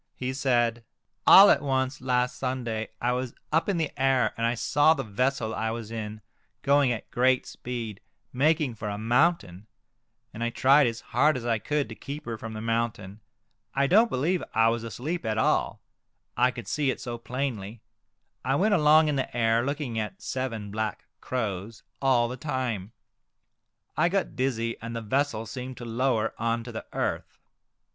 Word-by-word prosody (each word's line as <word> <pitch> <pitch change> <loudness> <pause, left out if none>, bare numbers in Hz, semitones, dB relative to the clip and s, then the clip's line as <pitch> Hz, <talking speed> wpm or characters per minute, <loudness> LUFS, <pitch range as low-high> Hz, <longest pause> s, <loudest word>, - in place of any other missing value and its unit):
He 130 0 -3
said, 120 -3 +1 0.2
" - - -36
All 200 +1 +10
at - - +3
once 130 0 -1
last 125 -1 0
Sunday 120 -4 -3
I 120 - +1
was 125 -1 -3 0.2
up 160 +5 +2
in 195 - +1
the 160 -2 -1
air, 130 -5 +3
and 115 0 0
I 120 - 0
saw 145 +6 +3
the 135 - -3
vessel 115 +1 -1
I 110 0 -1
was 115 -1 -5
in 110 -1 -5 0.4
going 140 -2 +4
at 110 - -5
great 125 +1 +2
speed, 115 -4 -6 0.3
making 150 0 +2
for 105 -1 -5
a 100 - -4
mountain, 115 - +1 0.7
and 115 - -4
I 120 - +1
tried 135 +3 +4
as 115 -1 -3
hard 150 -2 +2
as 120 - -6
I 115 -2 +1
could 150 +3 -1
to 110 - -8
keep 145 +6 -8
her 115 - -3
from 110 0 -7
the 110 - -6
mountain. 115 -3 -2 0.6
I 140 +1 +3
don't 215 +10 +5
believe 165 +6 0
I 115 0 +5
was 115 0 -1
asleep 125 - -4
at 110 -1 -1
all, 110 - +1 0.5
I 125 +2 +4
could 120 -2 -8
see 150 -3 0
it - - -2
so 120 -1 -5
plainly. 115 -4 -4 0.6
I 135 - +1
went 205 +7 +2
along 155 -2 +5
in 150 -2 0
the 130 -2 -3
air, 115 0 +3
looking 140 -4 -2
at 110 - -5
seven 115 -6 -4
black 110 -1 -3
crows 105 -3 -4 0.2
all 130 -3 +3
the 125 +2 -6
Crows. - - -30
29 145 - -1 0.2
time. 95 +4 -12 1.0
I 170 - +3
got 195 +1 -1
dizzy, 115 -3 -1
and 115 +1 -6
the 115 - -3
vessel 130 0 -1
seemed 125 +3 -7
to 120 - -7
lower 115 -1 0
on 115 +1 0
to 120 - -8
the 110 - -7
earth. - - -3
120 Hz, 185 wpm, -27 LUFS, 115-135 Hz, 1.0 s, All